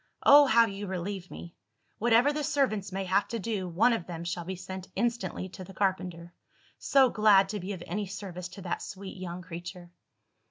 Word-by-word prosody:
Oh, 285 0 +8
how 230 -1 +6
you 200 -1 -6
relieve 185 0 -4
me! 170 - -10 0.4
Whatever 240 +5 +4
the 300 0 -2
servants 235 -10 0
may 195 +1 -3
have 190 +2 +2
to 230 - -3
do, 205 -4 -3
one 215 +8 +3
of 200 -7 -3
them 170 -2 -6
shall 175 0 -3
be 190 +2 -4
sent 185 +1 -8
instantly 235 -3 -1
to 185 - -9
the 190 +1 -12
carpenter. 180 -3 -2 0.5
So 265 -3 +4
glad 205 -3 +5
to 210 0 -3
be 185 +2 -5
of 180 -3 -7
any 200 +4 -3
service 185 -2 -6
to 195 - -8
that 175 - -3
sweet 195 0 -8
young 180 -1 -6
creature!" 175 +1 -8
195 Hz, 195 wpm, -29 LUFS, 180-215 Hz, 0.5 s, Oh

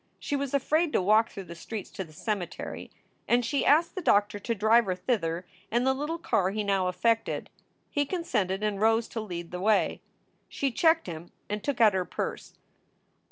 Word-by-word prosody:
She 290 - -3
was 280 -1 -1
afraid 305 +4 +2
to - - +4
walk 215 +4 +4
through 195 - -8
the 170 - -9
streets 200 +5 -7
to 190 - -5
the 160 - -15
cemetery, 180 +2 -4 0.4
and 240 0 +3
she 275 +5 0
asked 320 +4 +4
the 375 - -4
doctor 205 -7 +2
to 230 +3 -2
drive 220 +3 +4
her 185 -2 -1
thither 180 -4 -1 0.2
in 240 +2 +1
the 265 +1 +3
little 295 +5 -3
car 220 - +1
he 210 +2 -2
now 195 -2 +1
affected. 225 +5 0 0.4
He 290 -1 0
consented 210 - -1
and 210 -1 -1
rose 225 +1 +3
to 225 - -4
lead 175 -5 -6
the 180 0 -5
way. 215 +1 +2 0.5
She 275 -1 -1
checked 320 +6 +3
him 170 -1 -8 0.2
and 210 0 -3
took 280 -1 -2
out 220 -3 +6
her 190 -1 +1
purse. - - -5
215 Hz, 195 wpm, -28 LUFS, 190-265 Hz, 0.5 s, out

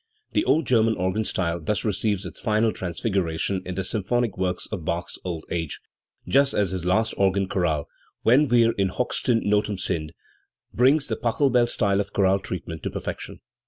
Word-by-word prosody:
The 310 - +2
old 160 -1 +3
German 115 -3 +3
organ 95 +4 0
style 85 -4 -1
thus 105 +1 -1
receives 100 -1 0
its 90 - -7
final 110 +1 +2
transfiguration 95 -1 -2
in 90 - -4
the 95 - -2
symphonic 110 +4 -1
works 90 -1 -1
of 95 -6 -4
Bach's 85 +3 -3
old 85 -4 -4
age, 80 -4 -3 0.5
just 140 +1 +3
as 100 -3 +1
his 90 -2 -4
last 110 +5 +2
organ 95 0 +2
chorale, 80 -6 0 0.4
"Wenn 135 +6 +5
wir 120 -2 +4
in 95 -1 +2
hochsten 120 +2 0
Ndten 105 -1 +1
sind", 80 -5 -2 0.6
brings 135 +5 +3
the - - -1
Pachelbel 125 0 +2
style 100 -3 +1
of 100 0 -3
chorale 95 -1 +3
treatment 85 -4 -6
to - - -3
perfection. - - -6
100 Hz, 170 wpm, -24 LUFS, 90-115 Hz, 0.6 s, Wenn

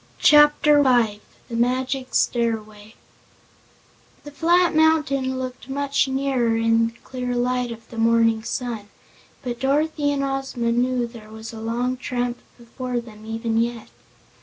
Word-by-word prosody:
Chapter 295 0 +6
Five 235 -5 +2 0.3
The 235 - -6
Magic 255 +2 -1
Stairway 215 -3 -1 1.3
The 290 - -10
flat 345 +4 +3
mountain 280 -5 +2
looked 255 0 -6
much 280 0 0
nearer 265 -4 0
in 230 0 +3
the 230 - -9
clear 250 -1 -4
light 250 0 0
of 230 -1 -10
the 230 - -6
morning 230 -1 +3
sun, 230 -3 -4 0.5
but 240 -2 -4
Dorothy 290 +2 +1
and 280 -1 -1
Ozma 270 -3 -2
knew 245 +1 +1
there 230 -2 -12
was 220 +1 -9
a 220 - -8
long 240 +3 -1
tramp 245 -1 -3 0.2
before 245 +1 -4
them, 220 -2 -12
even 225 0 -1
yet. 235 -1 -2
245 Hz, 135 wpm, -23 LUFS, 230-270 Hz, 1.3 s, Chapter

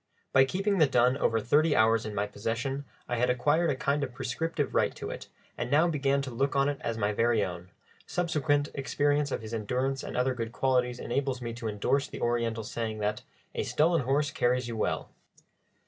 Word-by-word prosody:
By 135 0 +7
keeping 195 +6 0
the 155 - +6
dun 125 0 +3
over 115 -4 +2
thirty 145 +7 +3
hours 110 0 +3
in 105 - -6
my 105 - +1
possession 120 +7 -3 0.2
I 120 - -1
had 125 +2 +2
acquired 145 +7 +2
a 140 - +1
kind 140 +2 0
of 130 -3 -5
prescriptive 145 +4 -2
right - - +2
to - - -5
it, - - -7 0.3
and - - -2
now 155 +4 +4
began 140 -3 +1
to 135 - -5
look 135 +4 0
on 140 0 +3
it 145 - -3
as 115 -1 -2
my 105 -1 0
very 115 -1 +2
own; 90 0 -7 0.4
subsequent 150 -4 +1
experience 145 +1 +1
of 115 - -3
his 110 +1 -7
endurance 125 +5 -1
and - - -5
other 130 +1 +2
good 115 -2 -5
qualities 125 -2 +1
enables 135 +1 -2
me 120 -2 -5
to 115 -1 -5
endorse 110 +7 0
the - - -8
Oriental 115 -2 0
saying 110 0 -4
that 105 0 -1 0.3
a - - -1
"stolen 165 +1 +2
horse 140 +3 +1
carries 125 0 +1
you 115 - -4
well." 110 - -2
125 Hz, 205 wpm, -29 LUFS, 115-145 Hz, 0.4 s, By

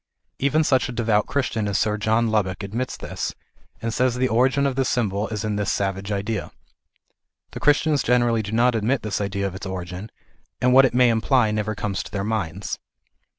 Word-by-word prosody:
Even 150 +3 +2
such 130 -5 +2
a - - -3
devout 115 -3 +1
Christian 115 -6 -1
as 100 - 0
Sir 105 -1 +1
John 110 +2 +1
Lubbock 100 -2 0
admits 115 +6 -3
this, - - -4 0.5
and 115 -1 -1
says 125 +1 +1
the 130 +1 +1
origin 130 +4 +2
of 135 -2 0
this 135 0 +1
symbol 105 -3 0
is 105 -2 -4
in 105 -1 -1
this 105 -2 0
savage 100 +1 -2
idea. 100 -4 -2 1.0
The - - -7
Christians 145 0 +3
generally 120 -2 +2
do 105 -1 -6
not 120 +2 +3
admit 115 +4 0
this 105 -1 -2
idea 100 0 -2
of 95 - -3
its 95 +1 -7
origin; 90 +2 -6 0.5
and 125 0 +3
what 135 +1 +8
it 125 - 0
may 125 -1 +5
imply 115 0 +2
never 110 0 -2
comes 100 -2 -2
to - - -9
their 100 -1 -2
minds. 100 -3 -3
110 Hz, 195 wpm, -23 LUFS, 100-125 Hz, 1.0 s, what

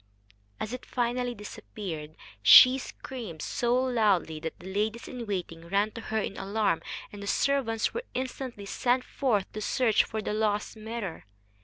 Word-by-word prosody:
As 215 - -4
it 250 - -5
finally 245 0 -1
disappeared, 175 -6 -7 0.3
she 255 - +9
screamed 225 - -7
so 240 0 +1
loudly 215 -11 +2
that 160 +1 -5
the 190 +2 -8
ladies 215 +3 -1
in 245 -3 -6
waiting 170 -4 -4
ran 200 +4 +1
to 230 - -8
her 220 0 -3
in 205 -2 -2
alarm, 200 -2 0 0.3
and 200 -1 -5
servants 250 -5 +1
were 475 - -2
instantly 255 -4 -4
sent 245 +5 +1
forth 225 -10 0
to 215 - -6
search 225 0 +3
for 220 - -4
the 210 - -2
lost 210 0 0
mirror. 220 -4 -5
215 Hz, 155 wpm, -28 LUFS, 200-245 Hz, 0.3 s, she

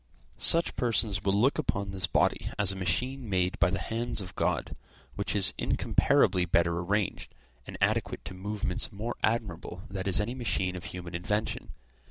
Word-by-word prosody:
Such 170 +1 +3
persons 110 -4 0
will 95 - +2
look 135 +6 +3
upon 100 -1 -1
this 95 -4 -1
body - - +1
as 100 -2 +4
a - - -4
machine 115 +8 -1
made 95 +3 +1
by 85 - +4
the 95 - -1
hands 115 +2 -3
of 95 -2 -6
God, - - -1 0.4
which - - -1
is - - +3
incomparably 90 -1 +3
better 85 0 +2
arranged, 100 +3 -1 0.3
and - - -7
adequate - - 0
to 95 - -5
movements 100 +3 -2
more 110 +4 -4
admirable 95 -5 -1
than 95 0 -3
is 95 - +4
any 105 +4 -1
machine 95 -7 -1
of 90 - -7
human 90 -1 -6
invention. 105 +6 -2
100 Hz, 170 wpm, -29 LUFS, 90-110 Hz, 0.4 s, as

